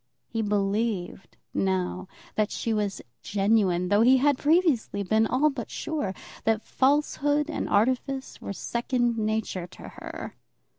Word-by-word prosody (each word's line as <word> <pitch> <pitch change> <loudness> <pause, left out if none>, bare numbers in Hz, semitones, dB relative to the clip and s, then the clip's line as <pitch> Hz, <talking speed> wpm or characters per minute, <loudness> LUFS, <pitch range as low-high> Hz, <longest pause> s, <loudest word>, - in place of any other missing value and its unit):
He 225 - -2
believed, 205 -2 -1 0.2
now, 185 -1 -1 0.3
that 215 0 +1
she 230 - -2
was 205 -2 -2 0.2
genuine; 195 -3 +2
though 205 +2 +4
he 255 +3 +6
had 285 0 +3
previously 295 - +2
been 220 +3 +2
all 290 +6 +3
but 245 -5 -6
sure 250 -12 -3 0.3
that 220 -1 +1
falsehood 290 +2 +1
and - - -3
artifice 260 +5 0
were - - -5
second 235 +2 -1
nature 215 -4 -1
to - - -11
her. - - -8
220 Hz, 135 wpm, -27 LUFS, 200-265 Hz, 0.3 s, he